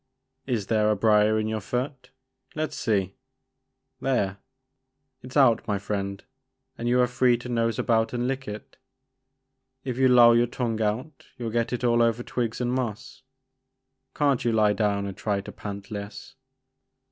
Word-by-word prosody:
Is 115 -6 -1
there 105 0 +2
a 105 - +3
brier 105 +1 +3
in 110 0 -1
your 110 -1 -2
foot? 125 +4 -4 0.2
— - - -34
let 155 0 -2
's - - -6
see, 95 -4 0 0.4
— - - -51
there! 100 -7 0 0.8
it 125 - -11
's - - -1
out 120 -5 +4
my 105 -2 0
friend 100 -1 -4 0.5
and 120 +1 -3
you 125 +1 +3
are - - +5
free 125 0 +2
to 120 - -9
nose 115 -2 0
about 115 -1 +1
and 120 0 -1
lick 135 +1 -3
it. 105 +6 -8 1.1
If 125 -1 -4
you 130 - +5
loll 120 -2 +7
your 120 +1 +3
tongue 115 -2 -2
out 125 +8 -3
you'll 115 -3 -4
get 115 +1 0
it 125 0 -3
all 120 -1 +3
over 115 +1 +1
twigs 120 -3 -3
and 125 0 -1
moss. 120 -2 -4 0.9
Can't 140 -4 +2
you 120 - +1
lie 105 -2 +3
down 100 -1 0
and 100 -1 -5
try 100 0 -1
to - - -8
pant 100 +1 -8
less? 100 0 -7
115 Hz, 180 wpm, -26 LUFS, 105-125 Hz, 1.1 s, loll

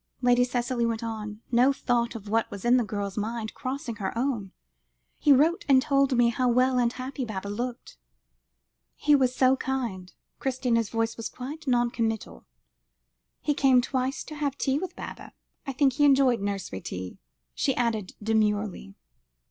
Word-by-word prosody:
Lady 245 0 +5
Cicely 245 0 -1
went 230 0 -1
on, 215 -1 -5
no 250 +3 +5
thought 240 -3 0
of 215 -2 -8
what 225 +2 +1
was 200 +1 -8
in 245 +1 +5
the 245 - +2
girl's 205 -1 -3
mind 220 +1 -3
crossing 255 -3 -5
her 205 +2 -3
own; 235 -7 -1 0.7
"he 295 - +4
wrote 310 +6 +4
and 265 -1 +7
told 275 -1 +2
me 240 -1 +5
how 250 +2 +1
well 255 +1 +3
and 240 0 +2
happy 260 +2 -5
Baba 200 -4 -5
looked." 240 +4 -5 1.0
"He 295 - +2
was 260 -3 +3
so 260 0 +4
kind." 235 -9 -3 0.3
Christina's 245 -4 0
voice 225 0 -1
was 225 -1 -4
quite 295 +5 -8
non 240 -2 +2
committal. 225 - -3 0.9
"He 295 - +1
came 270 -3 +4
twice 260 +2 -1
to 310 - -9
have 290 -2 -2
tea 270 +1 +1
with 375 +2 -6
Baba - - -8 0.3
I - - -1
think 270 0 +2
he 290 - +1
enjoyed 270 -5 +4
nursery 195 - -3
tea," 90 0 -6 0.3
she 270 - 0
added 225 -5 -1
demurely. 210 - 0
245 Hz, 165 wpm, -27 LUFS, 220-265 Hz, 1.0 s, and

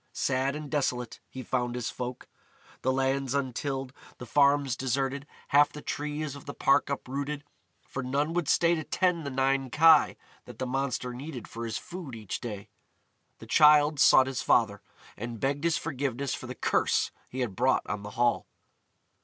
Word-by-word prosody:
Sad 135 +2 0
and 150 0 -6
desolate 125 -5 -1
he 130 - -7
found 125 0 -1
his 120 -2 -3
folk: 125 0 -6 0.5
the 130 - +1
lands 135 0 0
untilled, 135 0 -2 0.2
the 125 - -8
farms 140 0 +3
deserted, 135 +2 -2 0.2
half 145 0 +5
the 150 - -9
trees 150 -1 -3
of 140 - -12
the 140 - -6
park 140 +1 +3
uprooted, 140 +2 -4 0.4
for 135 - -4
none 140 +5 -1
would 175 -4 -1
stay 170 0 +4
to 160 -2 -2
tend 170 -2 0
the - - -1
nine 135 0 +1
kye 160 +2 +5 0.3
that - - -11
the 130 - -2
monster 130 -1 -2
needed 130 0 -7
for 115 0 -6
his 115 - -3
food 170 -8 -8
each 110 -4 -5
day. 105 -3 -6 0.7
The - - -12
Childe 150 -1 +5
sought 130 - +7
his 130 -1 -3
father, 105 -4 +2 0.3
and 120 0 -6
begged 140 +5 -1
his 170 -1 +2
forgiveness 140 -4 -2
for 130 - -6
the 125 - -6
curse - - +1 0.2
he 130 - -4
had 110 -6 -2
brought 130 +4 +2
on 105 -1 -4
the 105 - -7
Hall. 120 0 +2
135 Hz, 175 wpm, -28 LUFS, 125-145 Hz, 0.7 s, sought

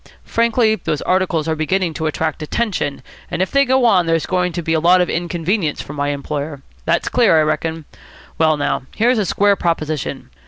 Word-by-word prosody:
Frankly, 230 -1 +2
those 155 -8 -3
articles 185 -4 0
are 160 - 0
beginning 170 +2 0
to 160 0 -2
attract 155 0 -2
attention, 155 - -2 0.3
and - - -3
if 185 - 0
they 275 0 +4
go 260 0 +3
on 185 -7 +4
there's 165 -1 +1
going 180 -1 0
to 175 - -3
be 165 0 0
a 160 - +2
lot 175 +3 +5
of 180 - +1
inconvenience 170 0 -1
for 140 - -7
my 145 -1 -2
employer. 145 0 -4 0.2
That's 170 +1 +1
clear, 230 -10 +4
I - - +4
reckon. 160 +1 -2 0.5
Well, 155 -1 +3
now, 145 -2 -2
here's 235 +2 +2
a 200 - 0
square 205 +2 +3
proposition. 155 -5 -3
165 Hz, 195 wpm, -18 LUFS, 155-195 Hz, 0.5 s, lot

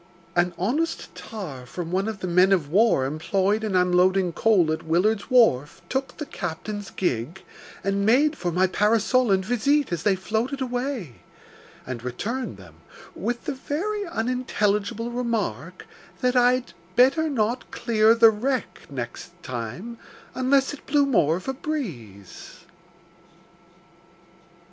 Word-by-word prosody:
An 175 0 +1
honest 250 - -1
tar 180 - -7
from 170 +5 -6
one 190 +3 0
of 215 -4 -5
the 185 - -2
men 180 +2 +4
of 170 -7 +2
war 200 - +3
employed 190 +9 0
in 210 -3 -1
unloading 180 0 +3
coal 180 -4 +3
at 160 - -2
Willard's 200 - +1
Wharf 220 - +3
took 265 -1 -3
the 300 - -4
captain's 205 - -5
gig, 155 +1 -3 0.4
and 195 0 0
made 280 +8 +4
for 175 - -3
my 180 +3 +3
parasol 220 +5 +2
and 190 -1 +2
visite 265 +5 +1
as 170 -2 -2
they 195 +2 +2
floated 220 +8 -2
away, 245 - -3 0.7
and 125 -2 -6
returned 225 - -4
them - - -15 0.4
with 240 0 -3
the 290 - -2
very 375 +11 -3
unintelligible 230 -5 -1
remark, 205 - -3 0.4
that 250 0 +1
I'd 250 0 +3 0.2
"better 275 +6 +4
not 240 -2 -1
clear 225 -1 +3
the 230 -1 +7
wreck 255 +4 -3
next 135 +6 -6
time 130 - -6 0.3
unless 265 +2 +2
it 290 - -12
blew 290 0 +3
more 165 - +3
of 185 - -10
a 265 - -1
breeze." 145 - -7
210 Hz, 135 wpm, -24 LUFS, 175-250 Hz, 0.7 s, the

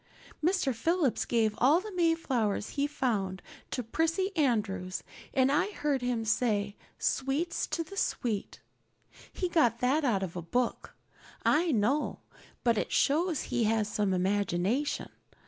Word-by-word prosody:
Mr. 345 -6 +2
Phillips 315 +3 +1
gave 225 -3 +2
all 285 +7 +5
the 430 +3 -7
Mayflowers 300 - +1
he 285 0 0
found 215 -10 -1 0.3
to 250 - -3
Prissy 330 - 0
Andrews 205 - 0 0.3
and 260 0 +3
I 295 +8 +2
heard 290 -6 0
him 245 -2 -1
to 220 - -2
say 205 -4 0 0.2
'sweets 275 +6 0
to 335 - -2
the 360 +5 -11
sweet.' 225 - -2 0.7
He 365 - -2
got 310 -10 +3
that 270 +5 +2
out 210 -8 +1
of 180 -2 -5
a 175 - -3
book, 245 +9 -2 0.5
I 330 +3 +3
know; 255 +5 +1 0.4
but 235 -3 +3
it - - -3
shows 320 +2 +2
he 235 - 0
has 215 -1 +1
some 210 -2 0
imagination. 195 +7 0
250 Hz, 145 wpm, -30 LUFS, 210-310 Hz, 0.7 s, all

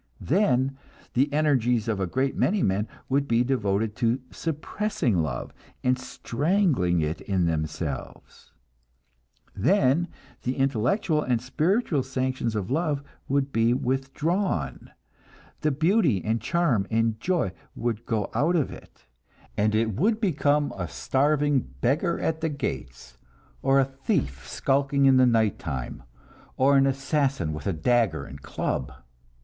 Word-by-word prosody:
Then 135 -6 +1 0.3
the 135 +4 +2
energies 125 -7 +2
of 110 -3 -1
a 95 - 0
great 130 +9 0
many 200 0 +1
men 100 +3 +1 0.2
would 140 +1 +1
be 115 +1 +3
devoted 110 -4 0
to 120 +1 +1
suppressing 160 - -1
love 70 -6 -4 0.3
and 125 0 +3
strangling 130 - 0
it 75 +2 -2
in 95 -3 0
themselves; 80 -3 -4 1.0
then 155 - +3 0.3
the 125 +1 -2
intellectual 135 - +1
and 125 -5 +1
spiritual 155 - +1
sanctions 130 -3 -2
of 105 +1 -3
love 150 -2 0 0.2
would 140 0 0
be 115 +1 +3
withdrawn, 135 +9 -1 0.7
the 155 - +1
beauty 155 - +2
and 110 +1 0
charm 125 - +1
and 115 -1 +1
joy 175 - 0 0.2
would 115 -1 -2
go 110 -4 -1
out 165 +5 +2
of 155 -5 +1
it, - - -14 0.5
and 105 +1 +2
it 110 0 +1
would 210 - +1
become 150 -7 +1
a 90 -3 -3
starving 145 - +1 0.2
beggar 155 - +1
at 160 0 -1
the 160 - 0
gates, 60 - -5 0.4
or 135 0 +4
a 135 - +4
thief 130 - -2
skulking 140 0 +1
in 135 -1 +6
the 130 -1 +6
night 110 -4 +2
time, 65 -6 -5 0.6
or 140 +2 +4
an 135 0 +5
assassin 135 - 0
with 75 +2 -6
a - - +2
dagger 85 - +1
and 70 +1 -10
club. - - -3
130 Hz, 135 wpm, -26 LUFS, 105-145 Hz, 1.0 s, in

